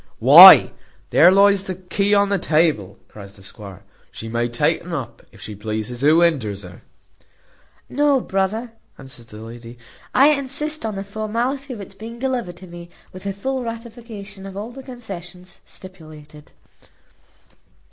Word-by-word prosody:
"Why, - - +9 0.4
there 170 - +6
lies 200 0 +4
the 185 - -5
key 195 +2 -2
on 200 0 +2
the 200 -1 0
table," 150 - 0
cries 100 -1 -13
the 100 - -17
squire. 100 -1 -11 0.3
"She 115 - -9
may 120 +1 -2
take 150 +9 0
un 175 -1 -6
up, 135 -6 -7
if - - -18
she 105 - -8
pleases: 110 +3 -5
who 155 +4 +4
hinders 115 - 0
her?" 90 0 -13 1.1
"No, 285 0 +1
brother," 215 +3 -3 0.3
answered 130 -4 -12
the 105 - -13
lady, 115 +1 -11 0.3
"I 275 +3 +5
insist 295 0 -2
on 215 - -5
the 195 - -5
formality 230 +7 -4
of 225 -5 -7
its 195 - -11
being 230 +2 -10
delivered 235 -9 -4
me, 170 0 -12 0.2
with 185 +2 -9
a - - -1
full 260 +6 -4
ratification 230 -4 -9
of 195 0 -10
all 215 +4 -6
the 270 +2 -11
concessions 185 -8 -11
stipulated." 155 -5 -14
185 Hz, 155 wpm, -20 LUFS, -, 1.1 s, Why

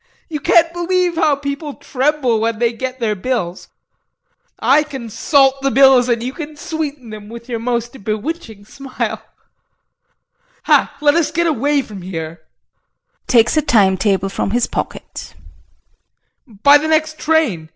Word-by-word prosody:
You 305 -2 -4
can't 330 +3 +3
believe 350 0 0
how 310 -3 +2
people 280 +1 -5
tremble 270 -4 0
when 225 0 -1
they 235 +1 +1
get 260 +2 -5
their 225 -3 0
bills 200 -4 -3 0.9
I 285 +3 +4
can 270 -7 -7
salt 270 +3 +2
the 275 - +1
bills 265 -2 +5
and 235 -1 0
you 255 +2 -4
can 305 -1 -7
sweeten 295 -7 -5
them 210 -1 -10
with 235 +1 -10
your 235 -2 -3
most 235 0 -3
bewitching 220 - -5
smile 270 +3 -5 1.4
ha, - - +2
let 290 -1 +4
us 330 -2 +1
get 340 +2 0
away 290 -2 +1
from 205 -5 -10
here 165 -2 -6 0.9
[Takes 235 +1 +4
a - - +4
time 205 -9 +3
table 195 0 0
from 195 - -2
his 240 +3 +1
pocket] - - -6 1.1
immediately 215 -5 -19
by 285 +1 +8
the 310 - -3
next 310 0 0
train. 275 - 0
260 Hz, 150 wpm, -17 LUFS, 225-300 Hz, 1.4 s, by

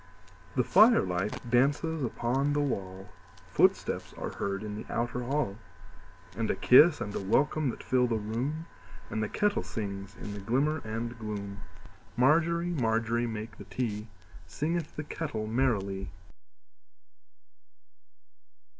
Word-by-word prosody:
The - - +3
firelight 105 - +4
dances 145 +6 +2
upon 130 +4 0
the 145 - +1
wall, 95 -8 -3 0.4
Footsteps - - +2
are - - -4
heard 100 0 -3
in 105 -1 -5
the 105 - -8
outer 120 +1 -1
hall, 125 -5 -1 0.8
And 115 -1 -1
a - - +2
kiss 145 - +6
and 100 - -4
a - - -1
welcome 140 +8 +2
that - - -6
fill 125 -1 +2
the 115 -2 0
room, 125 +10 -3 0.5
And 110 - -1
the 110 - -1
kettle 205 0 +1
sings 100 -3 -5
in 105 - -7
the 100 - -6
glimmer 135 +10 +1
and 115 +2 -4
gloom. 100 -2 -5 0.6
Margery, 170 +6 +3
Margery, 115 -4 +1
make 110 0 -6
the - - -9
tea, 110 -4 -3 0.4
Singeth 165 - -2
the 155 - -4
kettle 145 -8 -4
merrily. 100 - 0
120 Hz, 130 wpm, -30 LUFS, 105-145 Hz, 0.8 s, kiss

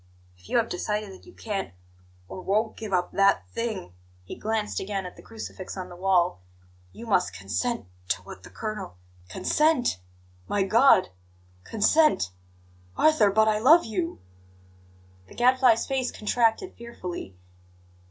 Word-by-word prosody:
If 90 0 -19
you - - +2
have 230 -1 +2
decided 210 +2 -3
that 190 - -14
you - - -12
can't, 195 - -5 0.5
or 185 - -8
won't, 215 +4 0
give 220 -2 -7
up 180 -1 0
that 200 0 +3
thing" 220 - -4 0.3
he 90 - -8
glanced 220 -1 -2
again 195 -1 -3
at 180 - -8
the - - -13
crucifix 215 -4 -8
on 185 -1 -6
the 175 - -10
wall 180 - +1 0.5
"you 235 - -10
must 90 - +1
consent 95 - -2 0.2
to 90 +1 -1
what 95 - -11
the - - -13
colonel 215 - -6 0.2
" 90 0 -27
"Consent! 300 - +2 0.5
My 205 -1 +1
God 220 0 +5 0.5
consent 225 - +3 0.7
Arthur, 305 -10 +5
but 220 +2 +3
I 215 -1 +2
love 310 +9 +6
you!" 180 - -3 1.1
The - - -15
Gadfly's 250 -1 +4
face 265 -2 -1
contracted 230 - 0
fearfully. 180 - -8
210 Hz, 145 wpm, -26 LUFS, 180-235 Hz, 1.1 s, love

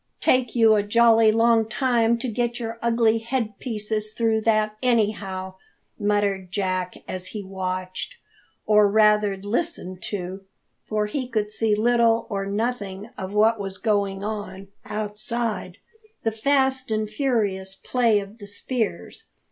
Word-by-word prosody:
"Take 255 -2 +2
you 225 -2 +6
a 210 - +3
jolly 225 +1 +5
long 225 0 +3
time 235 -3 +2
to 250 +2 -4
get 240 +1 -1
your 230 -1 -5
ugly 230 -1 +3
head 225 -3 -3
pieces 215 -2 -3
through 225 -2 +1
that, 215 -1 +1
anyhow!" 205 -6 0 0.5
muttered 205 -2 0
Jack, 185 -2 -1
as 185 0 -5
he 210 -2 -6
watched 185 -1 -4 0.5
or 210 -1 +5
rather 210 -1 +4
listened 205 - -3
to, 190 -1 -5 0.5
for 215 -1 0
he 250 +5 -3
could 215 -4 -1
see 215 -1 +1
little 230 +1 +3
or 195 -1 -2
nothing 205 -1 -3
of 190 -1 -6
what 220 +1 +4
was 195 -1 -4
going 200 -3 0
on 205 -2 -5 0.2
outside 215 -1 -3 0.5
the 225 - +1
fast 265 +3 +1
and 215 -1 0
furious 210 -6 -1
play 230 0 +2
of 200 +3 -10
the 205 - -10
spears. 225 +2 -4
215 Hz, 140 wpm, -24 LUFS, 200-230 Hz, 0.5 s, you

